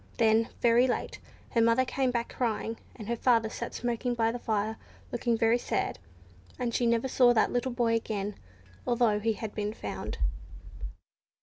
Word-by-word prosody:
Then, 225 0 +3
very 240 +2 +5
late, 245 - -2 0.3
her 230 - +3
mother 230 +3 +4
came 265 0 0
back 235 -1 -2
crying, 225 -2 -1 0.2
and 215 -4 -9
her 235 - 0
father 230 -2 +2
sat - - -5
smoking 240 0 -1
by 225 -1 +2
the 245 - -5
fire 220 -1 -1 0.3
looking 235 -1 0
very 230 +1 +3
sad, - - -2 0.6
and 245 -2 -2
she 240 - +2
never 235 +2 +2
saw 245 -1 +5
that 225 - +3
little 245 +1 0
boy 240 -1 +1
again, 210 -3 -2 0.5
although 235 -3 +3
he 225 +1 +1
had 215 0 -6
been 210 0 -3
found. - - -5
230 Hz, 170 wpm, -29 LUFS, 220-245 Hz, 0.6 s, very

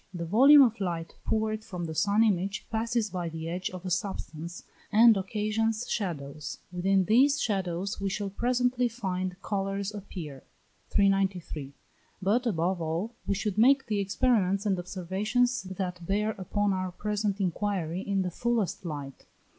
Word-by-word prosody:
The 170 -1 -3
volume 275 - +8
of 230 -3 +1
light 170 -4 -3
poured 215 0 0
from 180 -5 -5
the 160 - -4
sun 205 +6 +3
image 200 -1 0
passes 225 -1 0
by 175 -2 -3
the 160 0 -6
edge 180 +2 -2
of 185 0 -9
a 185 - -3
substance, 170 -2 -4 0.3
and 225 +1 +7
occasions 215 +3 -1
shadows. 150 -7 -4
Within 190 +1 +2
these 270 - +4
shadows 195 -1 -2
we 195 - 0
shall 200 0 -3
presently 245 +2 +1
find 185 -5 -3
colours 195 0 -2
appear. 170 -9 -7 0.5
393. 190 -8 0 0.4
But, 215 +6 +1
above 180 -2 0
all, 165 +8 -2
we 200 - +1
should 205 0 -2
make 265 +3 +5
the 210 -2 -1
experiments 200 -1 +1
and 195 -3 +1
observations 200 +8 0
that 180 -2 -4
bear 210 +5 0
upon 205 0 -1
our 185 -1 -2
present 210 +1 -2
inquiry 185 -2 -1
in 195 -1 0
the 180 - -3
fullest 235 -1 -1
light. 145 -5 -7
195 Hz, 150 wpm, -28 LUFS, 180-215 Hz, 0.5 s, volume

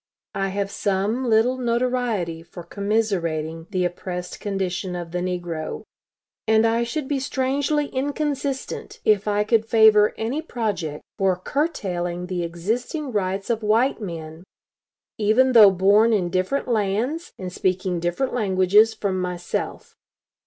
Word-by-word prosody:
I 195 -1 -1
have 200 +1 -2
some 210 +7 -1
little 235 +4 +3
notoriety 235 -8 -1
for 170 +1 -11
commiserating 170 -5 -2
the 185 -3 0
oppressed 180 0 -5
condition 190 -2 -3
of 170 -1 -6
the 180 - -2
negro; 175 -3 -4 0.6
and 220 0 +4
I 230 +1 +2
should 265 +4 -3
be 280 -1 0
strangely 280 +2 0
inconsistent 280 0 -3
if 215 -1 +3
I 210 0 +2
could 220 +1 +2
favor 220 -2 +5
any 245 +8 -2
project 205 - -3 0.2
for 190 -2 +3
curtailing 180 - -2
the 180 -1 -3
existing 225 - -3
rights 195 0 -1
of 225 -1 -1
white 225 +4 +2
men, 165 -3 -7 0.8
even 220 +5 +4
though 220 -5 +9
born 200 +5 +4
in 180 -5 0
different 185 +9 0
lands, 235 - -1
and 185 -1 -6
speaking 185 -1 -1
different 175 +10 -1
languages 210 0 +3
from 195 -3 -2
myself. 180 -1 -4
205 Hz, 130 wpm, -23 LUFS, 180-235 Hz, 0.8 s, though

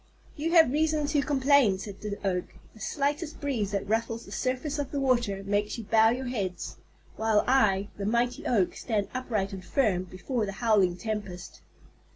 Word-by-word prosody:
"You 325 +3 -2
have 325 -7 +7
reason 310 0 +1
to 290 0 +1
complain," 275 -7 +3
said 195 0 -8
the 205 -1 -4
Oak. 180 -2 0 0.3
"The 220 - -16
slightest 295 +5 -2
breeze 250 -9 -1
that 200 -1 -2
ruffles 230 +1 -1
the - - -13
surface 265 +3 -2
of 285 - -2
the 285 - -2
water 235 -7 +1
makes 205 +2 -1
you 230 - -6
bow 220 +1 +5
your 255 +3 -2
heads, 200 -8 -4 0.4
while 220 -1 +2
I, 205 -7 +3
the 200 - -4
mighty 235 +2 0
Oak, 200 -7 +2
stand 210 -4 -2
upright 220 -7 -2
and 190 -1 -7
firm 190 -5 +1
before 210 +6 -3
the 195 - -4
howling 200 -5 +2
tempest." 195 -4 -5
225 Hz, 180 wpm, -28 LUFS, 200-265 Hz, 0.4 s, have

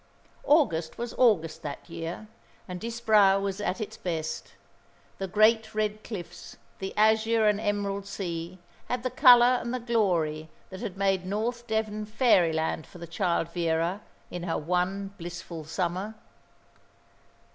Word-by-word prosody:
August 175 - +2
was 235 0 -4
August 180 -11 +3
that 145 -1 -7
year, 165 +5 -6 0.4
and 180 -1 -6
Disbrowe 220 -4 +3
was 195 0 -3
at 195 - -2
its 215 - -5
best. 160 -3 -4 0.6
The 195 - -2
great 220 +2 +3
red 215 0 -1
cliffs, 190 -7 -8 0.2
the 190 0 -4
azure 220 +1 +4
and 210 0 +2
emerald 200 -2 -2
sea 175 -2 -5 0.3
had 250 -1 -2
the 255 - -1
colour 250 -2 +7
and 235 - -4
the 255 - -2
glory 175 -10 0 0.2
that 190 - -7
had 205 -5 -5
made 195 -2 +1
North 235 +4 -2
Devon 215 -1 -2
fairyland 170 - +2
for - - -14
the 170 - -8
child 170 -1 -1
Vera 170 +3 -1 0.3
in 175 - -5
her 170 -1 -2
one 185 +4 -1
blissful 170 -2 -7
summer. 185 +6 -3
195 Hz, 140 wpm, -27 LUFS, 170-220 Hz, 0.6 s, colour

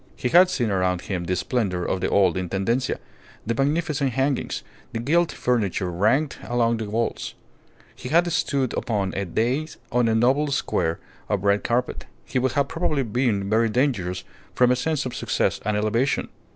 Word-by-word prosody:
Had 180 +2 +7
he - - -5
seen 120 - 0
around 90 -2 +1
him 90 -3 -3
the 90 +2 0
splendour 95 -2 -1
of 95 - -1
the - - 0
old 95 -4 +3
Intendencia, 95 +8 -1 0.5
the 115 - 0
magnificent 145 0 0
hangings, 135 +2 -1 0.3
the - - -2
gilt 165 +8 +2
furniture 100 -7 0
ranged 115 - +1
along 115 -1 +1
the 110 -2 -4
walls; 115 +2 -2 0.7
had 170 +4 +4
he 175 - -2
stood 135 -5 0
upon 100 -5 -1
a 100 - -2
dais 125 - -1
on 125 0 +2
a 110 - +2
noble 130 +6 +3
square 85 - 0 0.3
of 100 -3 0
red 100 0 +2
carpet, 120 +1 -1 0.2
he 130 - -1
would 130 0 0
have 140 0 +1
probably 155 -4 0
been 110 -4 0
very 110 +2 +2
dangerous 105 -8 0 0.3
from 125 0 +4
a - - +4
sense 150 +3 -1
of 125 - -4
success - - 0
and 105 +1 0
elevation. 115 +6 0
115 Hz, 175 wpm, -24 LUFS, 100-135 Hz, 0.7 s, Had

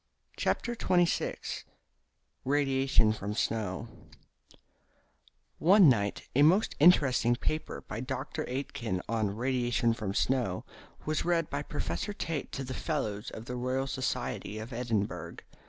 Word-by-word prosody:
CHAPTER 240 - 0
XXVI 175 -5 0 0.8
RADIATION 135 -5 +3
FROM 105 -1 -4
SNOW 110 -1 -1 1.7
One 185 -1 +7
night 100 -5 +1
a 140 - +5
most 180 +9 +5
interesting 135 -7 +5
paper 155 +5 -3
by 110 - -6
Dr. 135 +5 -4
Aitken, 120 -7 -3
on 110 -3 0
"Radiation 120 -1 +1
from 105 -3 -4
Snow," 125 -9 0 0.4
was 155 0 0
read 170 -2 +1
by 140 - -1
Professor 150 +7 -3
Tait 160 -7 -4
to 135 - -4
the 130 0 -5
Fellows 110 -10 -2
of 110 - -8
the 125 - -5
Royal 130 +2 -1
Society 130 -5 -3
of 110 +3 -7
Edinburgh. 115 -4 -2
130 Hz, 120 wpm, -30 LUFS, 110-145 Hz, 1.7 s, One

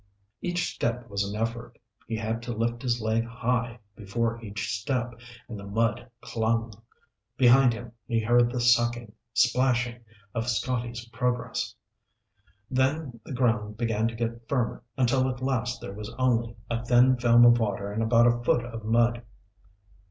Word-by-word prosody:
Each 175 0 -1
step 120 +1 -2
was 100 0 0
an 100 +2 -4
effort. 115 +1 -4 0.3
He 115 - -2
had 115 +1 -2
to 120 0 -4
lift 115 +1 -1
his 120 -2 0
leg 110 +1 +1
high 120 0 -2 0.2
before 115 +2 -2
each 105 +1 -4
step, 120 +3 -2 0.3
and 110 -3 -7
the - - -9
mud 115 +4 -1
clung. 115 0 -1 0.6
Behind 125 0 +6
him, 120 0 -7 0.2
he 115 -2 +1
heard 120 +2 +4
the 125 - -2
sucking, 120 -1 +2 0.2
splashing, 120 0 +2 0.3
of 115 0 -2
Scotty's 120 +1 -2
progress. 125 -2 -2 1.0
Then 130 -1 0
the - - -7
ground 115 -4 0
began 115 -1 0
to 115 - -4
get 115 0 -4
firmer 125 -4 -1 0.2
until 130 +1 +2
at 125 -1 -4
last 125 -2 -1
there 100 - -7
was 105 +1 -7
only 120 -3 +1
a 115 0 -2
thin 125 +2 +5
film 120 0 +6
of 120 0 +6
water 100 -2 -2
and 110 - -1
about 115 +1 +4
a 120 0 +2
foot 120 0 +2
of 115 -2 -7
mud. 120 +2 +2
120 Hz, 160 wpm, -27 LUFS, 115-125 Hz, 1.0 s, Behind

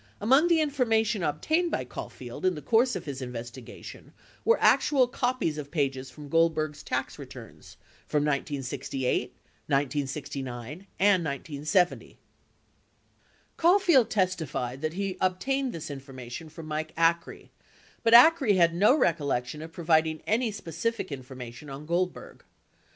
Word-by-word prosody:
Among 265 +10 +4
the 335 -2 +4
information 225 -7 +1
obtained 310 - 0
by 130 - -2
Caulfield 120 0 -8
in 185 -1 +2
the 150 - -7
course 240 +2 +3
of 185 - -5
his 140 -3 -5
investigation 120 0 -9 0.3
were 465 - +4
actual 265 -4 +4
copies 245 -11 -1
of 145 -1 -7
pages 135 -4 -1
from 150 -1 -11
Gold 165 +2 +3
berg's 155 -1 -3
tax - - -3
returns - - -12 0.3
from 150 -1 +1
1968, 135 -2 -2 0.4
1969, 140 +1 -3
and 195 -3 +4
1970. 155 +5 -1 1.4
Caulfield 345 - +4
testified 160 - -1
that 155 0 -2
he 195 0 -3
obtained 255 +9 0
this 160 -5 -6
information 135 +2 -8
from 160 +1 -10
Mike 155 0 -4
Acree, 165 +1 0 0.5
but 230 0 +5
Acree 265 -4 +7
had 170 -2 +4
no 205 +9 +5
recollection 145 - 0
of 160 +1 -8
providing 160 -2 +1
any 230 +2 +1
specific 205 +4 -3
infor 130 -2 -8
mation 125 +3 -9
on 140 +2 -8
Goldberg. 175 +3 -3
160 Hz, 130 wpm, -27 LUFS, 140-215 Hz, 1.4 s, Acree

